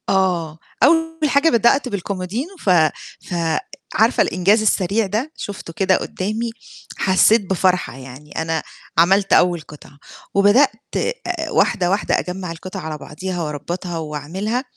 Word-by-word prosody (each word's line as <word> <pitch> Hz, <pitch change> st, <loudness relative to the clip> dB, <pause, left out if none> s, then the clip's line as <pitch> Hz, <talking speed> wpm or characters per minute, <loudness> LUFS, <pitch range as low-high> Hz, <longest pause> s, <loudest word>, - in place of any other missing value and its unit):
آه، 175 Hz, -5 st, +1 dB, 0.3 s
أول 325 Hz, +1 st, +3 dB
حاجة 280 Hz, +4 st, +4 dB
بدأت 250 Hz, +2 st, +3 dB
بالكُمودينو 200 Hz, -, -3 dB
ف -, -, -2 dB, 0.6 s
فعارفة 175 Hz, +6 st, 0 dB
الإنجاز 195 Hz, +5 st, +2 dB
السريع 210 Hz, 0 st, +1 dB
ده؟ 225 Hz, +10 st, -2 dB
شُفته 195 Hz, -4 st, -7 dB
كده 190 Hz, +1 st, +2 dB
قُدّامي، 215 Hz, +5 st, -3 dB, 0.5 s
حسّيت 195 Hz, +2 st, +3 dB
بفرحة، 185 Hz, -5 st, +1 dB
يعني 135 Hz, +3 st, -11 dB
أنا 160 Hz, -1 st, -1 dB, 0.3 s
عَمَلت 195 Hz, +4 st, +4 dB
أول 175 Hz, -2 st, +4 dB
قطعة. 150 Hz, -2 st, -14 dB, 0.4 s
وبدأت 205 Hz, +8 st, +5 dB, 0.8 s
واحدة 175 Hz, -1 st, +2 dB
واحدة 200 Hz, +3 st, +1 dB
أجمَّع 180 Hz, -1 st, -5 dB
القطعة 185 Hz, +3 st, -7 dB
على 155 Hz, -2 st, -5 dB
بعضيها 175 Hz, +4 st, -5 dB
وأربَّطها 170 Hz, +4 st, -4 dB
وأعمِلها، 165 Hz, -, -3 dB
190 Hz, 120 wpm, -20 LUFS, 165-215 Hz, 0.8 s, وبدأت